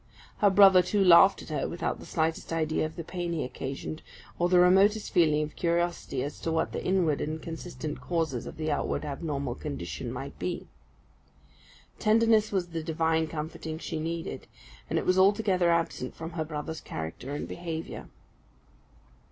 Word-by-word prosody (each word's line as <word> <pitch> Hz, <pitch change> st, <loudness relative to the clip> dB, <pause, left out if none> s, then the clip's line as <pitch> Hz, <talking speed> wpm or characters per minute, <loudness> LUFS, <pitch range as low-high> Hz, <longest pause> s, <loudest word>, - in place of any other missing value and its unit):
Her 205 Hz, -, +5 dB
brother, 195 Hz, -1 st, +7 dB
too, 195 Hz, +2 st, +1 dB
laughed 180 Hz, +2 st, +7 dB
at -, -, -12 dB
her 155 Hz, -, -2 dB
without 170 Hz, -, -3 dB
the -, -, -11 dB
slightest 160 Hz, 0 st, -1 dB
idea 155 Hz, -1 st, 0 dB
of 155 Hz, -, -13 dB
the 170 Hz, -, -5 dB
pain 175 Hz, 0 st, -4 dB
he 160 Hz, -, -1 dB
occasioned, 135 Hz, +4 st, -5 dB, 0.4 s
or 175 Hz, 0 st, +2 dB
the 180 Hz, -, +5 dB
remotest 195 Hz, +4 st, +4 dB
feeling 155 Hz, -3 st, +4 dB
of 150 Hz, -, -7 dB
curiosity 170 Hz, -6 st, -1 dB
as 145 Hz, -, -6 dB
to 165 Hz, -, -2 dB
what 160 Hz, 0 st, 0 dB
the -, -, -4 dB
inward 175 Hz, -6 st, +1 dB
and 155 Hz, +1 st, -3 dB
consistent 165 Hz, -2 st, -6 dB
causes 160 Hz, -8 st, -2 dB
of -, -, -9 dB
the 155 Hz, -1 st, -1 dB
outward 145 Hz, -, -1 dB
abnormal 140 Hz, -3 st, -3 dB
condition 70 Hz, -11 st, -5 dB
might -, -, -7 dB
be. -, -, -3 dB, 1.3 s
Tenderness 220 Hz, 0 st, +4 dB
was 185 Hz, -3 st, -1 dB
the 165 Hz, -1 st, -4 dB
divine 160 Hz, 0 st, +1 dB
comforting 155 Hz, 0 st, -5 dB
she 160 Hz, -1 st, -4 dB
needed; 165 Hz, +1 st, -4 dB, 0.4 s
and -, -, 0 dB
it -, -, -1 dB
was 185 Hz, +1 st, +3 dB
altogether 195 Hz, -2 st, +3 dB
absent 165 Hz, -6 st, 0 dB
from 165 Hz, +1 st, -6 dB
her 160 Hz, -2 st, -3 dB
brother's 155 Hz, +1 st, -5 dB
character 85 Hz, -, -6 dB
and -, -, -4 dB
behaviour. 165 Hz, -2 st, -6 dB
165 Hz, 170 wpm, -28 LUFS, 155-180 Hz, 1.3 s, brother